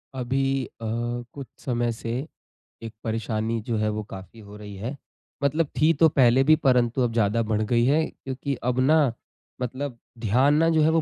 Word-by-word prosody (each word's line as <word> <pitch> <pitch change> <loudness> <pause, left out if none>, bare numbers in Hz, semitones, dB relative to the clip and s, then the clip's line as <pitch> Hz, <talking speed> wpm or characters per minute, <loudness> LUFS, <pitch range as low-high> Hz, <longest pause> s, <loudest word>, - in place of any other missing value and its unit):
अभी 135 +1 0
अ, 115 - -11 0.5
कुछ 140 -4 -8 0.2
समय 120 -2 0
से 115 0 -5 0.7
एक 115 -1 -7
परेशानी 110 0 -2
जो 115 -2 0
है 105 0 +1
वो 105 0 -3
काफ़ी 95 +2 -11
हो 105 0 -12
रही 105 -1 -9
है। 115 +9 -5 0.5
मतलब 150 +3 +2
थी 155 +2 +6
तो 160 - +8
पहले 130 -2 +4
भी 155 +3 +6
परंतु 125 -4 +2
अब 120 -2 +1
ज़्यादा 115 0 +2
बढ़ 105 - +1
गई 120 0 +4
है 150 +5 +3
क्योंकि 135 +1 -5
अब 125 +1 0
न 155 -5 +4 0.5
मतलब 130 +1 -4 0.2
ध्यान 130 +8 +3
न 165 - +4
जो 160 - +3
है 155 - +4
वो 165 0 +3
125 Hz, 185 wpm, -25 LUFS, 115-140 Hz, 0.7 s, तो